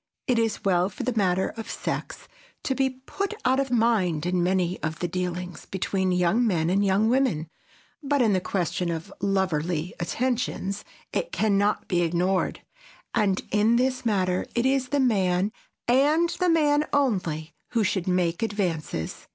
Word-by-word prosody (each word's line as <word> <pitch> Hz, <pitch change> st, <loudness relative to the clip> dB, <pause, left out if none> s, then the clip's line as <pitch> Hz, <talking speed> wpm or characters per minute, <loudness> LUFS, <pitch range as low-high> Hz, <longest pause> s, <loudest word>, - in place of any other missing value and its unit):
It 245 Hz, -2 st, +2 dB
is 225 Hz, -3 st, -1 dB
well 180 Hz, -1 st, +3 dB
for 190 Hz, -, -6 dB
the 250 Hz, 0 st, -1 dB
matter 190 Hz, -3 st, +2 dB
of 225 Hz, -1 st, -8 dB
sex -, -, -4 dB, 0.4 s
to 265 Hz, -, 0 dB
be 265 Hz, 0 st, +1 dB
put 275 Hz, +11 st, -5 dB
out 260 Hz, +1 st, +3 dB
of 275 Hz, -1 st, 0 dB
mind 215 Hz, -10 st, +2 dB
in 180 Hz, 0 st, +1 dB
many 180 Hz, 0 st, 0 dB
of 160 Hz, -1 st, -3 dB
the 175 Hz, -, -2 dB
dealings 180 Hz, 0 st, -4 dB
between 190 Hz, 0 st, -1 dB
young 180 Hz, +7 st, +2 dB
men 170 Hz, -4 st, +1 dB
and 200 Hz, +2 st, +2 dB
young 200 Hz, +2 st, +3 dB
women, 235 Hz, -, +1 dB, 0.5 s
but 285 Hz, -1 st, +1 dB
in 225 Hz, -5 st, +4 dB
the 185 Hz, -, +1 dB
question 180 Hz, -1 st, -1 dB
of 170 Hz, +4 st, -5 dB
loverly 180 Hz, -4 st, 0 dB
attentions 210 Hz, 0 st, -2 dB, 0.3 s
it -, -, -1 dB
can 215 Hz, -, +1 dB
not 205 Hz, +1 st, +1 dB
be 175 Hz, -2 st, +1 dB
ignored. 180 Hz, +3 st, 0 dB, 0.5 s
And 195 Hz, -3 st, +1 dB
in 215 Hz, +3 st, +3 dB
this 255 Hz, +1 st, +1 dB
matter 185 Hz, -5 st, 0 dB
it 235 Hz, +1 st, +1 dB
is 265 Hz, -1 st, +2 dB
the 285 Hz, +2 st, 0 dB
man, 195 Hz, -6 st, +2 dB, 0.4 s
and 295 Hz, +7 st, +4 dB
the 360 Hz, -1 st, 0 dB
man 300 Hz, -2 st, +3 dB
only, 180 Hz, -, 0 dB, 0.2 s
who 230 Hz, -2 st, +3 dB
should 190 Hz, -3 st, -1 dB
make 180 Hz, -2 st, +1 dB
advances. 175 Hz, -, -2 dB
195 Hz, 165 wpm, -26 LUFS, 180-245 Hz, 0.5 s, in